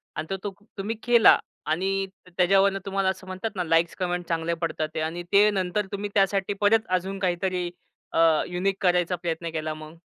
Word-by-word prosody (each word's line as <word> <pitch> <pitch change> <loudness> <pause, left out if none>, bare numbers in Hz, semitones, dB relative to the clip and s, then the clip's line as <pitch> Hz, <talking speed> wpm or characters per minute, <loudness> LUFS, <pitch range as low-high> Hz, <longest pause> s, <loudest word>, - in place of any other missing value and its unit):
आणि 160 +5 -3
तो 205 - -3 0.3
तुम्ही 205 +4 -3
केला. 240 -2 +7 0.3
आणि 195 +4 0 0.2
त - - -14
त्याच्यावरनं 195 +2 +4
तुम्हाला 195 -1 0
असं 190 0 -5
म्हणतात 185 +4 -4
ना, 180 - -1
लाइक्स, 165 0 +2
कमेंट्स 180 -1 -2
चांगले 165 0 0
पडतात 160 -2 -1
ते - - -1
आणि 165 +2 -3
ते 205 +1 +7
नंतर 195 +1 -1
तुम्ही 205 +1 -3
त्यासाठी 195 0 +2
परत 220 +2 +3
अजून 190 +2 -5
काहीतरी 180 -1 -1 0.4
अ, - - +1 0.3
युनिक 185 +2 -1
करायचा 180 -1 +2
प्रयत्न 165 0 -2
केला 155 -1 -2
मग? 155 +1 -10
185 Hz, 180 wpm, -25 LUFS, 170-195 Hz, 0.4 s, केला